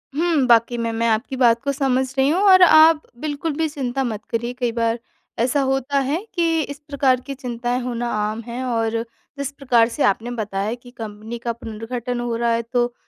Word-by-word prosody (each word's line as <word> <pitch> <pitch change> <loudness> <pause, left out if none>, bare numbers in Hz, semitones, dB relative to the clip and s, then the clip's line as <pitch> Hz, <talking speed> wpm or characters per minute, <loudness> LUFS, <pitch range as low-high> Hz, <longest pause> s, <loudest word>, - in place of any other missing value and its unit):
हुँ, 320 -4 +2
वाक़ई 235 0 +4
में 230 -1 -1
मैं 230 +1 0
आपकी 225 +4 -1
बात 235 -2 +3
को 280 - 0
समझ 265 -2 +1
रही 265 +1 +3
हूँ 355 +5 +2
और 370 -1 +8
आप 320 -2 +7 0.2
बिल्कुल 300 +2 -3
भी 320 -1 +1
चिंता 270 -3 -2
मत 215 -3 -4
करिए। 235 +1 -2
कई 240 -2 0
बार 230 0 0 0.4
ऐसा 255 +4 +2
होता 270 +1 0
है 275 +4 0 0.2
कि 330 -2 +2
इस 285 -1 -6
प्रकार 265 -3 +2
की 275 - -3
चिंताएँ 245 -1 -3
होना 240 -1 -3
आम 215 +1 -2
है 240 +2 -4
और 230 -2 0 0.4
जिस 280 0 -3
प्रकार 245 -5 +2
से 280 - -2
आपने 225 +5 +1
बताया 210 -2 -2
कि 245 - -13
कंपनी 220 +1 -7
का 235 - 0
पुनर्गठन 235 +2 -5
हो 240 -1 -2
रहा 235 0 +1
है 230 - +1
तो 240 0 +1
245 Hz, 200 wpm, -21 LUFS, 230-275 Hz, 0.4 s, और